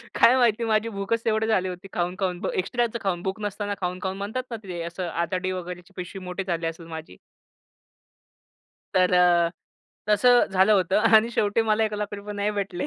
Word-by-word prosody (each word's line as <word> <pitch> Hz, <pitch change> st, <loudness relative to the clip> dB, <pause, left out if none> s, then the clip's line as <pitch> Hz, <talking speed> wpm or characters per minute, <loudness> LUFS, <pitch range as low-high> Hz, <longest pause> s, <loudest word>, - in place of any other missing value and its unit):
काय 245 Hz, -, +6 dB
माहिती 235 Hz, -2 st, +3 dB
माझी 220 Hz, 0 st, +1 dB
भूकच 215 Hz, +2 st, -2 dB
तेवढी 220 Hz, -1 st, +1 dB
झाली 190 Hz, -4 st, +2 dB
होती 180 Hz, +2 st, -8 dB
खाऊन-खाऊन 180 Hz, +1 st, -2 dB
एक्स्ट्राचं 235 Hz, +4 st, -1 dB
खाऊन 180 Hz, -3 st, -1 dB
भूक 190 Hz, +2 st, -3 dB
नसताना 205 Hz, 0 st, -3 dB
खाऊन 180 Hz, 0 st, -2 dB
खाऊन 190 Hz, 0 st, -2 dB
म्हणतात 210 Hz, +6 st, -3 dB
ना 230 Hz, -, -3 dB
ते 180 Hz, -3 st, -5 dB
असं 175 Hz, +2 st, -4 dB
आतडी 180 Hz, +3 st, -2 dB
वगैरेची 180 Hz, 0 st, -7 dB
पिशवी 180 Hz, +2 st, -6 dB
मोठे 180 Hz, +2 st, -4 dB
झाली 170 Hz, -2 st, -1 dB
असेल 165 Hz, 0 st, -7 dB
माझी. 160 Hz, -, -9 dB, 1.8 s
तर 185 Hz, -1 st, +3 dB
अ, 175 Hz, -1 st, +5 dB, 0.6 s
तसं 240 Hz, +4 st, +5 dB
झालं 190 Hz, +2 st, +4 dB
होतं 190 Hz, -2 st, +3 dB, 0.2 s
आणि 220 Hz, +2 st, +3 dB
शेवटी 215 Hz, -1 st, +1 dB
मला 220 Hz, 0 st, +2 dB
1 215 Hz, -, -2 dB
लाख 210 Hz, 0 st, -3 dB
रुपये 205 Hz, +1 st, -7 dB
नाही 205 Hz, +1 st, 0 dB
भेटले. 200 Hz, -3 st, -3 dB
195 Hz, 175 wpm, -25 LUFS, 180-215 Hz, 1.8 s, काय